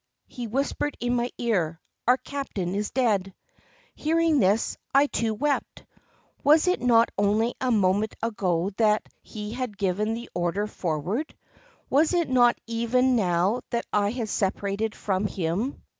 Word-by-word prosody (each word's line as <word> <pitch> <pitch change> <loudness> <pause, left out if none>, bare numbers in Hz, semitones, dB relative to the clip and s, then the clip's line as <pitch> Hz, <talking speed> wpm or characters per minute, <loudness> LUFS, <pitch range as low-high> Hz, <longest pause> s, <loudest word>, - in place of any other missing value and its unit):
He 245 -3 -7
whispered 275 +4 -2
in 245 0 0
my 240 0 0
ear, 175 -9 0 0.3
"Our 250 +1 +6
captain 245 -12 -4
is 205 +1 -1
dead." 205 -7 0 0.6
Hearing 325 -1 +2
this, 205 +2 +2 0.2
I 280 +1 +7
too 230 -6 -1
wept. 290 +5 -2 0.6
Was 305 +4 +5
it 360 - +2
not 235 -2 +4
only 215 +4 +2
a 260 - +1
moment 205 -1 +2
ago 195 -5 -1
that 215 -1 +3 0.2
he 210 -1 -7
had 245 -5 -4
given 205 +3 0
the 235 +1 -7
order 175 +4 -1
"Forward"? 185 - -3 0.5
Was 310 +6 +3
it 340 -4 +1
not 245 -2 +4
even 235 +3 +1
now 190 +2 +1
that 235 - -2
I 205 -1 +2
had 230 -1 -3
separated 200 +2 -1
from 195 0 -1
him? 195 +9 -3
225 Hz, 145 wpm, -26 LUFS, 200-250 Hz, 0.6 s, I